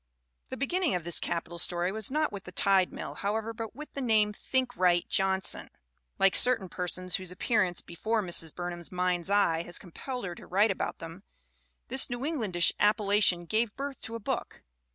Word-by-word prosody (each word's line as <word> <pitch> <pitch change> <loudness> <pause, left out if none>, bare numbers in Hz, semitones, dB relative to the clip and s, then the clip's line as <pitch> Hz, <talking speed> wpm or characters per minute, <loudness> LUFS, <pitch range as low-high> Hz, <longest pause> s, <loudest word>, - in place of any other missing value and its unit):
The 260 - -5
beginning 330 - 0
of 175 - -2
this 170 0 +3
capital 170 0 -3
story 175 +1 0
was 220 0 +1
not 305 +2 0
with 200 -1 -8
the 180 - -9
Tide 190 0 +3
Mill, - - -6
however, 220 +3 -2
but 225 -1 -7
with 300 +1 -10
the 280 - -4
name 215 -4 +3
Thinkright 205 -9 0
Johnson. 190 0 +1 0.5
Like 195 - +4
certain 230 -7 +4
persons 180 -1 0
whose 185 -2 -7
appearance 185 -2 0
be - - -12
fore 220 +5 0
Mrs. 170 -3 +1
Burnham' 175 0 -4
s 170 - -8
mind's 180 0 -1
eye 200 -5 +3
has 175 +1 -2
compelled 245 +7 -6
her 175 - -4
to - - -13
write 205 +4 +3
about 190 - -3
them, 165 +3 -9 0.7
this 265 +2 +5
New 245 0 -4
Englandish 215 - +2
appellation 205 -4 +3
gave 220 +3 0
birth 275 -1 -5
to 225 +1 -6
a - - -4
book. 205 - -4
195 Hz, 190 wpm, -29 LUFS, 175-230 Hz, 0.7 s, this